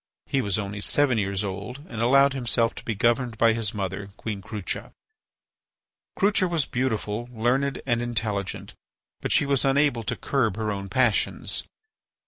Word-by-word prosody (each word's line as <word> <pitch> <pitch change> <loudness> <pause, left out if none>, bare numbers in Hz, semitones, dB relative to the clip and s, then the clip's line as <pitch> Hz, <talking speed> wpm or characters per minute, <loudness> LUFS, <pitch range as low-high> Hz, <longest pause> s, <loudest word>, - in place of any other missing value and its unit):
He 135 - 0
was 100 -3 +1
only 105 0 -4
seven 130 0 +2
years 100 0 -1
old 105 +9 -6
and 115 -1 -5
allowed 135 +3 +5
himself 120 -3 +1
to - - -10
be 115 - -2
governed 120 +1 +1
by 115 0 +5
his 110 -1 0
mother, 100 -1 -4
Queen 105 -3 -4
Crucha. 100 -1 -4 1.2
Crucha 200 -2 +3
was 165 -4 +1
beautiful, 120 -2 -2
learned, 125 +4 0
and 120 -3 +1
intelligent; 110 -5 -3 0.5
but - - -2
she - - +4
was 140 -2 +2
unable 135 -3 +3
to - - -1
curb 110 -8 0
her 110 -1 -1
own 100 -1 -4
passions. 120 +1 +1
115 Hz, 155 wpm, -25 LUFS, 105-130 Hz, 1.2 s, allowed